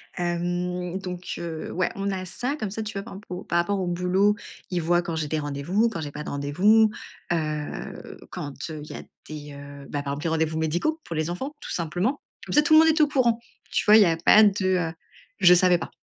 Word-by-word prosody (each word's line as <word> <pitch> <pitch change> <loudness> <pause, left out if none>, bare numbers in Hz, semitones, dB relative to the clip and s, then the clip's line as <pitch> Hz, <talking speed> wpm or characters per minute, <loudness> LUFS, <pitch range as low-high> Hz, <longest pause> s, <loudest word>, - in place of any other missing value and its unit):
Hem, 175 +1 -2
donc 180 -1 -6
heu, 165 -2 -5
ouais, 185 0 0
on 195 0 -2
a 190 -1 -3
ça, 245 +9 -3
comme 215 -9 -4
ça, 220 +3 -4
tu 215 +1 -5
vois? 195 - -3
Par - - -10
exemple 195 +2 -11
au 180 - -6
par 170 - -1
rapport 195 +4 +1
au 185 - -2
boulot, 180 +4 +2 0.3
ils 180 - -1
voient 175 +2 +2
quand 170 -1 -4
j'ai 160 -2 -2
des 155 +1 -1
rendez-vous, 150 +11 0
quand 180 -7 -5
j'ai 145 -2 -5
pas 150 +1 -6
de - - -6
rendez-vous, 195 +11 +3 0.4
heu, 155 -3 -4
quand 145 +3 -6
il 150 -1 -7
y - - -6
a - - -6 0.3
des, 150 -1 -8
heu, 140 0 -10
ben 145 -1 -3
par 140 - -3
exemple 145 - -5
des 165 - 0
rendez-vous 160 0 0
médicaux 175 - 0
pour 165 - -6
les 155 +2 -1
enfants 270 +11 -5
tout - - -7
simplement. 180 - -1 0.2
Comme - - -5
ça 295 - +6
tout 315 +1 +2
le 310 - +9
monde 320 0 +6
est 315 0 +3
au 300 - +6
courant. 245 -5 +2 0.3
Tu - - +1
vois? 210 - +8
Il 220 - +8
y - - +4
a 165 -2 +2
pas 210 +6 +7
de, 200 -2 +3 0.3
heu, - - -13 0.5
je 180 -3 +8
savais 180 -1 +4
pas. - - -6
175 Hz, 245 wpm, -25 LUFS, 160-205 Hz, 0.5 s, le